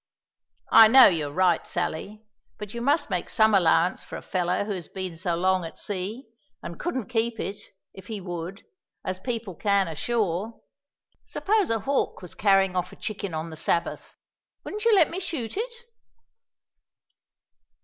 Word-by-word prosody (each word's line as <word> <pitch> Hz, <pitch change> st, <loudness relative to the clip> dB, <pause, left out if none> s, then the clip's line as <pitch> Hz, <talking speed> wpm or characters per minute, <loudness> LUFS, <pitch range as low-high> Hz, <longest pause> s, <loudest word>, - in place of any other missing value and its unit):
"I 225 Hz, -, +10 dB
know 260 Hz, +3 st, +9 dB
you're 155 Hz, -6 st, +2 dB
right, 180 Hz, +1 st, +2 dB
Sally; 210 Hz, +7 st, -4 dB, 0.3 s
but 210 Hz, -1 st, -7 dB
you 235 Hz, -, -5 dB
must 290 Hz, -1 st, +1 dB
make 180 Hz, -2 st, -2 dB
some 220 Hz, -1 st, +3 dB
allowance 175 Hz, -2 st, +3 dB
for -, -, -9 dB
a -, -, -10 dB
feller 180 Hz, +1 st, 0 dB
who 210 Hz, -, -4 dB
has 180 Hz, -5 st, -5 dB
been 185 Hz, -3 st, -6 dB
so 170 Hz, +1 st, -1 dB
long 185 Hz, +1 st, +1 dB
at 165 Hz, -, -8 dB
sea, 205 Hz, +6 st, -4 dB, 0.4 s
and 170 Hz, -, -7 dB
couldn't 260 Hz, -9 st, -2 dB
keep 230 Hz, -1 st, -1 dB
it, 200 Hz, +1 st, -4 dB, 0.3 s
if 190 Hz, -1 st, -12 dB
he 220 Hz, -2 st, -4 dB
would, 175 Hz, 0 st, -6 dB, 0.4 s
as 185 Hz, 0 st, -2 dB
people 230 Hz, -4 st, -4 dB
can 200 Hz, +1 st, +1 dB
ashore. 200 Hz, +5 st, -2 dB, 0.6 s
Suppose 420 Hz, -1 st, 0 dB
a 225 Hz, -1 st, 0 dB
hawk 275 Hz, -6 st, -1 dB
was 180 Hz, -, -9 dB
carrying 195 Hz, -2 st, +3 dB
off 180 Hz, 0 st, -1 dB
a -, -, -12 dB
chicken 200 Hz, -5 st, -5 dB
on 160 Hz, +1 st, -4 dB
the -, -, -7 dB
Sabbath 170 Hz, +2 st, -2 dB, 0.5 s
wouldn't 425 Hz, +2 st, -5 dB
you 460 Hz, -2 st, +6 dB
let 350 Hz, -5 st, +4 dB
me 355 Hz, -, -3 dB
shoot 325 Hz, -, -4 dB
it?" 475 Hz, +4 st, -3 dB
200 Hz, 165 wpm, -26 LUFS, 180-235 Hz, 0.6 s, I